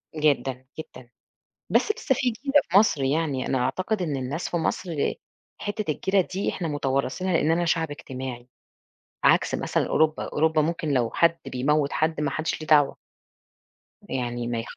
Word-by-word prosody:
جدًا، 135 -4 0
جدًا، 130 -5 -10 0.6
بس - - +3
لسة 425 - 0
في 255 -1 +1
جيرة 275 +5 +2
في 180 - +5
مصر، 200 -9 +4
يعني 140 -1 0
أنا 130 - +1
أعتقد 185 - -1
إن 155 -5 -1
الناس 135 +6 -3
في 175 - -1
مصر 165 -2 -1 0.5
حِتّة 205 -4 -2
الجيرة 190 +5 +1
دي 185 +2 -3
إحنا 175 - -3
متوارثينها، 145 +5 -1
لإننا 165 +2 +2
شعب 160 -2 0
اجتماعي 130 -4 -7 0.8
عكس - - +4
مثلًا - - 0
أوروبا، 155 0 +2
أوروبا 160 0 +2
ممكن 165 0 -2
لو 120 -4 +1
حد 170 +6 +3
بيموّت 140 +3 +1
حد 160 0 0
ما 150 -2 0
حدّش 155 +3 -2
ليه 155 - -7
دعوة. 145 -3 +4 1.1
يعني 120 -2 -2
ما. 115 -1 -2
155 Hz, 155 wpm, -25 LUFS, 135-170 Hz, 1.1 s, في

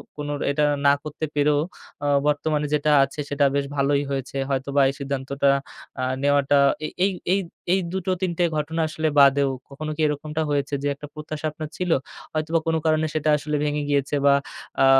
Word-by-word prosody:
কোনো 145 0 -4
র - - -8
এটা 150 +1 +1 0.2
না 140 - +7
করতে 155 +1 -4
পেরেও 145 0 +3 0.5
অ - - +1 0.2
বর্তমানে 150 0 +1
যেটা 150 0 +2
আছে 135 +2 -5
সেটা 145 0 +2
বেশ 140 -1 +1
ভালোই 140 +1 +2
হয়েছে। 135 0 -3
হয়তোবা 140 +1 +1
এই - - -3
সিদ্ধান্তটা 140 0 0 0.5
আ - - -1 0.2
নেওয়াটা 145 0 +3 0.3
এ - - -1 0.2
এই, 200 - +2 0.2
এই, 200 - +3 0.3
এই 190 - +3
২ 190 - -2
টো - - +3
৩ 185 -2 0
টে 175 - +2
ঘটনা 160 +2 -1
আসলে 155 0 -2
বাদেও 140 0 +5 0.2
কখনো 155 +3 -5
কি 160 - -3
এরকমটা 150 +2 -3
হয়েছে 145 0 -1
যে - - +1
একটা 145 +1 -9
প্রত্যাশা 155 0 -6
আপনার 155 0 -7
ছিল, 180 -2 -1 0.4
হয়তোবা 155 +1 0
কোন 165 - +2
কারণে 155 0 +3
সেটা 155 0 +1
আসলে 150 +1 -3
ভেঙে 150 0 0
গিয়েছে 140 0 +1
বা 140 - +7 0.5
আ - - +7
145 Hz, 190 wpm, -24 LUFS, 140-155 Hz, 0.5 s, না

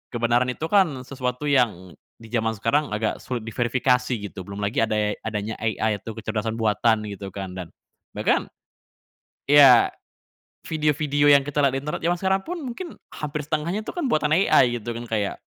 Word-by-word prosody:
kebenaran 120 +2 +2
itu 125 +5 -3
kan 165 -11 +3
sesuatu 125 0 -4
yang 105 -10 +1 0.2
di 115 -1 -15
zaman 115 -2 0
sekarang 140 +8 +1
agak 110 0 -2
sulit 120 -3 -5
diverifikasi 125 +2 0 0.2
gitu. - - -10
Belum 100 +1 -6
lagi 105 +7 -1
ade 105 -2 0
adanya 105 0 -4
AI 110 -1 -1
itu 115 +2 -8
kecerdasan 110 0 -3
buatan 110 0 +1
gitu 100 0 -7
kan 95 -2 -5
dan 90 -2 -6 0.5
bahkan - - +1 1.0
iya, 140 -4 +8 0.8
video-video 150 -2 +1
yang 140 -1 +6
kita 145 +1 -1
lihat 135 -1 +2
di - - -2
internet 150 - -3
jaman 175 +1 +1
sekarang 190 +1 +1
pun 355 +2 -4
mungkin 315 +8 -7 0.2
hampir 150 0 -4
setengahnya 165 +8 -2
itu - - -6
kan 345 -7 -2
buatan 155 -5 +1
AI 130 -8 +4
gitu 115 +1 -5
kan. 120 - -6
Kayak, 105 -3 -1
125 Hz, 170 wpm, -24 LUFS, 110-150 Hz, 1.0 s, iya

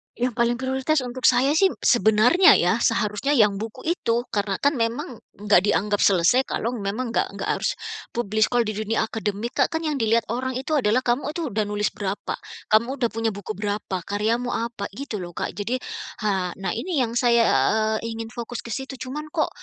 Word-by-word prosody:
Yang 245 0 -1
paling 235 0 +2
prioritas 265 +3 0
untuk 255 +1 -4
saya 270 +5 +4
sih 385 0 +4
sebenarnya 240 - +5
ya 180 +6 +3
seharusnya 230 +3 +1
yang 210 -6 +4
buku 220 +1 -6
itu 240 -8 0
karena 200 -2 -2
kan 285 -1 +2
memang 230 +1 -2 0.2
enggak 205 -2 +4
dianggap 205 +2 +1
selesai 195 +8 +4
kalau 230 - -2
memang 215 +5 -3
enggak - - -1
enggak - - -4
harus - - -1 0.4
publish, 215 -2 +1
kalau 245 -1 +1
di 215 -2 -3
dunia 220 +1 0
akademik, 220 +3 -4
Kak, 275 - +2
kan 320 - -1
yang 305 -3 -1
dilihat 225 -1 +1
orang 255 +2 -2
itu 280 +4 -1
adalah 245 0 +2
kamu 265 +4 -1
itu 325 -5 -3
udah 215 0 -1
nulis 210 0 -1
berapa? 200 0 -4 0.3
Kamu 230 +4 +3
udah 235 - +2
punya 225 -1 -2
buku 205 0 -6
berapa? 205 -2 -2
Karyamu 225 +4 -1
apa? 230 -3 -3
Gitu 235 -3 -5
loh, 175 -2 -7
Kak. - - -3
Jadi 230 +6 -3 0.4
ha 190 -4 0
nah - - -1
ini 325 0 -1
yang 235 0 -1
saya 235 -2 +4 0.6
ingin 225 0 -5
fokus 240 0 -6
ke - - -10
situ. 265 +3 -4
Cuman 280 +4 -5
kok 315 - +1
230 Hz, 190 wpm, -24 LUFS, 210-255 Hz, 0.6 s, sebenarnya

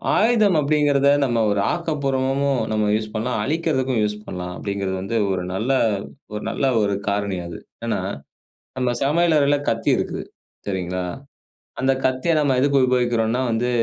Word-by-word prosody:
ஆயுதம் 215 -5 +4
அப்படிங்கிறத 145 -1 +3 0.2
நம்ம 120 -3 +1
ஒரு 100 - +1
ஆக்கப்பூர்வமாகவும் 140 -5 0
நம்ம 110 -1 +1
யூஸ் 110 0 -3
பண்ணலாம். 110 +1 -1
அழிக்கறதுக்கும் 135 -5 0
யூஸ் 105 0 -1
பண்ணலாம். 90 -2 -5
அப்படிங்கிறது 100 -2 -3
வந்து 110 +4 -2
ஒரு 90 -1 -1
நல்ல 110 +8 -1 0.6
ஒரு 105 - -4
நல்ல 135 - -1 0.2
ஒரு 100 -1 +1 0.2
காரணி 100 -2 -1
அது. 85 - -8 0.3
ஏன்னா - - 0 0.8
நம்ம 125 -1 +1
சமையல் 165 +4 +3
அறையில 145 0 +3
கத்தி 115 0 0
இருக்குது, - - -3 0.4
சரிங்களா! 90 -2 -2 0.8
அந்தக் 130 0 +1
கத்திய 130 +6 +1
நம்ம 140 -3 +2
எதுக்கு 140 +1 +3
உபயோகிக்கிறோம்னா 120 -2 +1
வந்து 120 +2 0
125 Hz, 145 wpm, -22 LUFS, 105-140 Hz, 0.8 s, ஆயுதம்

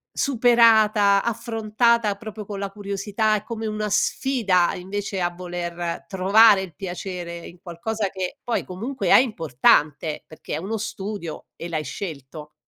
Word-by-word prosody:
superata, 220 -6 +4
affrontata, 230 -1 +1
proprio 215 0 -8
con 200 0 -6
la 200 0 -3
curiosità, 205 +2 -1
è 210 - -3
come 225 0 -5
una 215 -1 -2
sfida 205 -6 +1
invece 195 +2 -4
a 175 0 0
voler 175 -1 -5
trovare 200 +2 +5
il 175 -5 -8
piacere 175 -1 -6
in 175 - -14
qualcosa 195 +4 -3
che 190 -1 -5
poi 240 - -1
comunque 210 +4 -5
è - - +8
importante, 155 - +2
perché 155 - -9
è - - -2
uno 195 +7 -3
studio 205 -5 -6
e 170 - -7
l'hai 155 -3 -2
scelto. 150 -1 -7
200 Hz, 140 wpm, -23 LUFS, 175-220 Hz, -, è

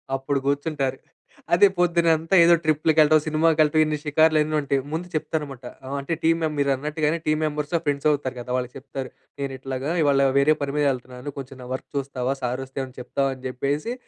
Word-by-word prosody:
అప్పుడు 135 +1 -1
కూర్చుంటారు. 140 -2 -1 0.6
అదే 200 +4 +7
పొద్దున్నంతా 170 0 +2
ఏదో 170 +1 +6
ట్రిప్‌లకెళ్ళటం. 155 0 +4
సినిమాకెళ్ళటం. 155 0 +3
ఇన్ని 155 0 -1
షికార్లు 155 +1 +3
అన్నుంటాయి. 150 -3 0
ముందు 170 +3 -3
చెప్తారనమాట. 145 -5 -3 0.2
ఆహ్, 140 +2 -4
అంటే 140 +4 -3
టీమ్ 165 +1 +3
మెం 155 - 0
మీరన్నట్టుగానే 150 +3 0
టీమ్ 155 +1 +1
మెంబర్స్ 150 +1 -3
ఫ్రెండ్స్ 145 +1 0
అవుతారు 135 -3 -2
కదా! 120 - -9
వాళ్ళకి 125 -1 -4
చెప్తారు. 130 -1 -7 0.3
నేను 135 -1 -3
ఇట్లాగా 135 +2 -4
ఇవాళ 140 -2 +4
వేరే 145 +3 +5
పని 140 0 -2
మీదెళ్తున్నాను. 130 -1 -2
కొంచెం 135 -1 -8
నా - - -9
వర్క్ 130 - -6
చూస్తావా 135 -1 -2
సార్ 125 +1 -2
వస్తే 130 - -19
ఏమన్నా 130 -1 -7
చెప్తావా 135 +2 -1
అని 130 - -17
చెప్పేసి 145 - -2
145 Hz, 170 wpm, -24 LUFS, 135-155 Hz, 0.6 s, అదే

